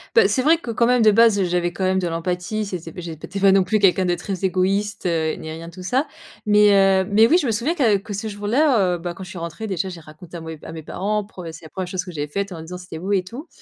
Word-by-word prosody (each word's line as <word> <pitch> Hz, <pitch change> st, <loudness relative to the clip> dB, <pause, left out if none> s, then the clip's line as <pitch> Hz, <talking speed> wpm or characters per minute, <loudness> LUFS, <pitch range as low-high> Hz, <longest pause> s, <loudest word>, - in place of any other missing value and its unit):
Bah, 455 Hz, -, +7 dB
c'est 260 Hz, -, +1 dB
vrai 315 Hz, +5 st, +4 dB
que, 245 Hz, -8 st, -6 dB
quand 235 Hz, +1 st, +2 dB
même, 250 Hz, 0 st, +3 dB
de 215 Hz, -1 st, +6 dB
base, 225 Hz, -1 st, +5 dB
heu, 190 Hz, -, +2 dB
j'avais 175 Hz, 0 st, 0 dB
quand 185 Hz, +2 st, -3 dB
même 190 Hz, 0 st, +2 dB
de 180 Hz, -, -1 dB
l'empathie, 180 Hz, +5 st, -2 dB
c'était 175 Hz, -4 st, -6 dB
p 180 Hz, -, -10 dB
j'étais 170 Hz, +3 st, -7 dB
pas 195 Hz, 0 st, +5 dB
non 195 Hz, -1 st, +5 dB
plus 215 Hz, +3 st, +1 dB
quelqu'un 190 Hz, -1 st, +4 dB
de 175 Hz, -, +1 dB
très 185 Hz, +2 st, -5 dB
égoïste, 195 Hz, +3 st, 0 dB
heu, 160 Hz, -3 st, 0 dB
ni 160 Hz, -, -8 dB
rien 165 Hz, +1 st, -7 dB
de -, -, -16 dB
tout 185 Hz, +1 st, -10 dB
ça, 255 Hz, +10 st, +1 dB, 0.4 s
mais 210 Hz, 0 st, +5 dB
heu, 195 Hz, -1 st, +4 dB
mais 215 Hz, +2 st, +5 dB
oui 330 Hz, -, +5 dB
je 360 Hz, -, 0 dB
me 235 Hz, -, +1 dB
souviens, 240 Hz, +10 st, -1 dB
que 240 Hz, -10 st, +3 dB
que 200 Hz, +2 st, -5 dB
ce 210 Hz, +3 st, -4 dB
jour-là 210 Hz, -, +2 dB
heu, -, -, -4 dB
bah 175 Hz, +1 st, -5 dB
quand 190 Hz, -, -9 dB
je 185 Hz, -, -10 dB
suis 180 Hz, -, -9 dB
rentrée 170 Hz, +6 st, -5 dB
déjà 190 Hz, -2 st, -2 dB
j'ai 175 Hz, -3 st, -8 dB
raconté 155 Hz, +3 st, -13 dB
à 170 Hz, -, -6 dB
mon 160 Hz, -, -8 dB
é 160 Hz, -1 st, -8 dB
à -, -, -8 dB
mes 160 Hz, -1 st, -8 dB
parents, 210 Hz, +6 st, -2 dB
pre 195 Hz, -3 st, -11 dB
c'est 160 Hz, -, -12 dB
la 160 Hz, -, -11 dB
1re 185 Hz, +4 st, -5 dB
chose 180 Hz, 0 st, -3 dB
que 180 Hz, -, -9 dB
j'avais 150 Hz, -3 st, -4 dB
faite 200 Hz, +6 st, -3 dB
en 170 Hz, -, -7 dB
disant: 175 Hz, +3 st, -7 dB
«C'était 180 Hz, -3 st, -9 dB
beau 190 Hz, +4 st, -2 dB
et 190 Hz, -2 st, +2 dB
tout». 245 Hz, -, -9 dB
190 Hz, 310 wpm, -21 LUFS, 175-210 Hz, 0.4 s, Bah